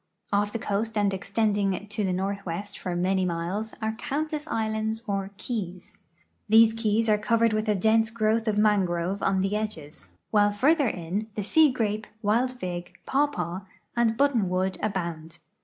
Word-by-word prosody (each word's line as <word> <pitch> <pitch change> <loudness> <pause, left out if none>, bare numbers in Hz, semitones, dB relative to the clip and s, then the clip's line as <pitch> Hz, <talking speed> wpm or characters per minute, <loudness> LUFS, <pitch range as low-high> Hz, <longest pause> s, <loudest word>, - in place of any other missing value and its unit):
Off 205 +1 +2
the 230 - -2
coast 220 +1 -2
and 205 -1 +2
extending 200 0 0
to 205 +1 -2
the 190 - 0
northwest 195 0 -3
for 180 -2 -4
many 185 +2 +1
miles 180 +5 -2
are 220 - +1
countless 300 +6 -3
islands 220 -1 -1
or 195 -2 -2
ke\'S. 185 -8 -5 0.5
These 225 +1 +7
keys 225 0 +1
are 210 -1 +3
covered 230 +1 +2
with 215 0 0
a 210 - +3
dense 220 +3 +3
growth 225 0 0
of 210 -1 +1
mangrove 195 -3 +1
on 190 -1 +2
the 195 +2 0
edges, 175 -9 -5 0.2
while 205 -1 +4
further 280 +8 +3
in 190 +3 -3
the 210 - -2
sea 305 +8 +5
gra[»e, 215 -3 -1 0.2
wild 235 +5 +2
fig, 180 -7 -6
})awpaw, 190 - 0 0.3
and 230 -1 +2
but 280 0 +3
tonwood 185 -3 0
abound. 170 -5 -3
210 Hz, 160 wpm, -26 LUFS, 190-225 Hz, 0.5 s, These